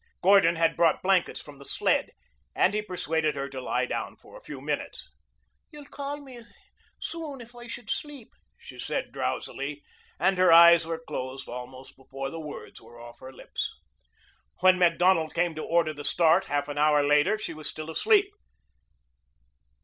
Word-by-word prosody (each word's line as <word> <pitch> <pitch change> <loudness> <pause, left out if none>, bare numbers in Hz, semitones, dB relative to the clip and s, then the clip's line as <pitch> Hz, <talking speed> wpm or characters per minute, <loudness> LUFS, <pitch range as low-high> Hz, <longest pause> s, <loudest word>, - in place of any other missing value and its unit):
Gordon 185 -3 +5
had 165 0 +2
brought 165 -2 +2
blankets 190 -1 +2
from 145 -2 -13
the - - -11
sled - - +1 0.5
and 190 - +3
he 210 - 0
persuaded 160 -6 -1
her 140 0 -3
to 130 -1 -7
lie - - -1
down - - -4
for - - -18
a - - -12
few - - -9
minutes. - - -5 0.6
"You'll 295 -1 -12
call 285 0 -6
me 260 -4 -12 0.6
soon 315 -5 -6
if 240 0 -13
I 240 0 -10
should 230 -1 -8
sleep," 290 -6 -6 0.2
she - - -13
said - - -3
drowsily, - - -4 0.4
and 190 -1 +2
her 185 - +5
eyes 170 0 +8
were 165 -1 -2
closed 130 +1 -5
almost 125 +2 -9
before 135 0 -7
the 165 - -6
words 150 -2 -9
were 120 - -15
off 120 0 -12
her 130 - -10
lips. - - -5 0.9
When 185 0 +5
Macdonald 175 -1 +3
came 175 -1 +1
to 155 - -6
order 165 -2 +1
the 145 -1 -9
start 170 +4 +3
half 145 0 -1
an 145 0 -4
hour 150 -1 +4
later, 150 +8 +3
she 215 - -5
was 155 -1 -6
still 155 +1 -7
asleep. 410 - +3
165 Hz, 170 wpm, -27 LUFS, 145-200 Hz, 0.9 s, eyes